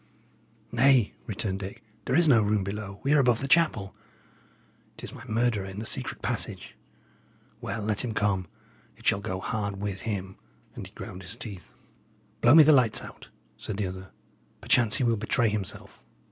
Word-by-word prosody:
"Nay," 125 -2 +4
returned 100 -3 -3
Dick, 95 0 -8 0.2
"there 130 - 0
is 170 +1 +5
no 120 -6 +6
room 105 -1 +1
below; 100 0 -6
we 140 +2 +2
are 150 - +5
above 120 -4 +3
the 135 - -3
chapel. 135 - +2 1.0
It - - -12
is - - -7
my - - -10
murderer 110 -3 0
in 95 +1 -8
the 110 - -4
secret - - -1
passage. - - -3 0.9
Well, 110 - -4
let 105 -1 0
him 115 -3 -4
come; 95 -4 0 0.5
it - - -18
shall 100 - +3
go 95 -3 -4
hard 100 0 -3
with 100 -2 -4
him;" 95 -3 -4 0.4
and - - -8
he - - -19
ground 90 - -8
his 95 +5 -9
teeth. 100 -7 -9 0.7
"Blow 120 +5 +7
me 160 - +10
the 155 +1 +6
lights 125 -5 +3
out," - - -12 0.3
said 105 - -5
the 105 - -1
other. 95 +1 -7 0.5
"Perchance 115 -4 +3
he 130 - 0
will 115 -2 +2
betray 110 +2 +1
himself." 105 -3 -5
105 Hz, 180 wpm, -27 LUFS, 100-120 Hz, 1.0 s, me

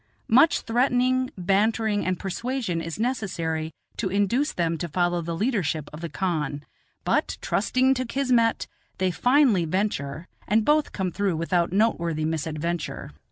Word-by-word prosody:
Much 270 +7 +5
threatening, 255 +1 +1
bantering, 205 +3 +1
and 185 -1 0
persuasion 200 -1 -3
is 165 +3 -6
necessary 170 -10 -2 0.3
to 195 - -1
induce 205 +9 +1
them 165 -1 0
to 170 +2 -4
follow 175 +1 0
the 170 0 -4
leadership 180 - -1
of 155 - -8
the 170 - -4
khan; 150 -4 -2 0.4
but, - - 0
trusting 260 +1 +2
to 255 -1 -2
kismet, 245 -3 +1 0.3
they 185 -1 +1
finally 245 - +3
venture, 165 -3 -2 0.2
and 215 +1 +2
both 300 0 +3
come 190 -2 -2
through 195 -1 0
without 170 +1 0
noteworthy 170 -7 +1
misadventure. 160 +1 -3
190 Hz, 140 wpm, -25 LUFS, 165-235 Hz, 0.4 s, Much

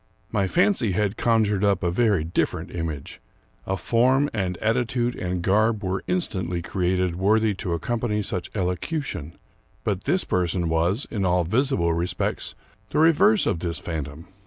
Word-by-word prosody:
My 100 -3 +1
fancy 175 - +2
had 105 +1 0
conjured 110 -4 +2
up 100 -2 +2
a 85 - +1
very 100 -4 +2
different 85 +2 -1
image. 80 -5 -5 0.5
A 95 - 0
form 130 +7 +2
and 95 -4 -2
attitude 120 +3 0
and 90 -1 -3
garb 110 +3 +2
were 95 0 -1
instantly 95 - -2
created 90 -1 0
worthy 105 +3 +3
to 90 - -2
accompany 105 +4 -1
such 90 - -3
elocution; 90 - -3 0.5
but 100 -3 -2
this 180 +6 +2
person 90 -1 0
was, 85 - +1
in 105 -4 -1
all 90 -1 +2
visible 95 - +1
respects, 85 +2 -2 0.3
the - - -2
reverse 185 +7 +5
of 85 - 0
this 85 -1 -3
phantom. 80 -1 -5
95 Hz, 150 wpm, -24 LUFS, 90-115 Hz, 0.5 s, reverse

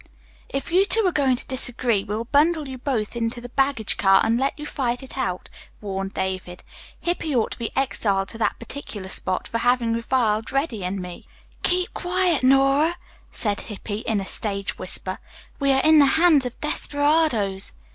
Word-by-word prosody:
"If 275 +4 -4
you 370 +3 +5
two 450 +3 +4
are 365 - +3
going 275 -5 +2
to 245 - -7
disagree 245 -5 0
we'll 210 +2 -3
bundle 295 +4 +2
you 260 -1 -7
both 240 -5 -2
into 235 +1 -2
the 245 +1 -9
baggage 270 -4 +1
car 195 0 +5
and 225 +1 +2
let 270 +3 0
you 300 - -7
fight 250 -3 -2
it 265 - -10
out," 185 -9 -3 0.3
warned 195 -1 -5
David. 185 -1 -4 0.4
"Hippy 340 -4 -2
ought 230 - +1
to - - -7
be 230 - -2
exiled 200 -7 0
to 225 - -6
that - - 0
particular 205 -9 -8
spot 185 -1 -2
for 230 - -2
having 240 -1 +2
reviled 230 -2 0
Reddy 275 - -1
and 185 +2 -3
me." 180 -1 -9 0.3
"Keep 360 0 +1
quiet, 360 -3 +1
Nora," 275 +5 +3 0.3
said 205 -3 -1
Hippy 210 0 -6
in 220 -2 -1
a 195 - -4
stage 200 0 -1
whisper. 185 +1 -1 0.4
"We 275 -1 +2
are 270 0 +3
in 315 0 +6
the 285 - +6
hands 315 -6 +5
of 245 - -10
desperadoes." 290 -10 +1
245 Hz, 180 wpm, -23 LUFS, 205-285 Hz, 0.4 s, in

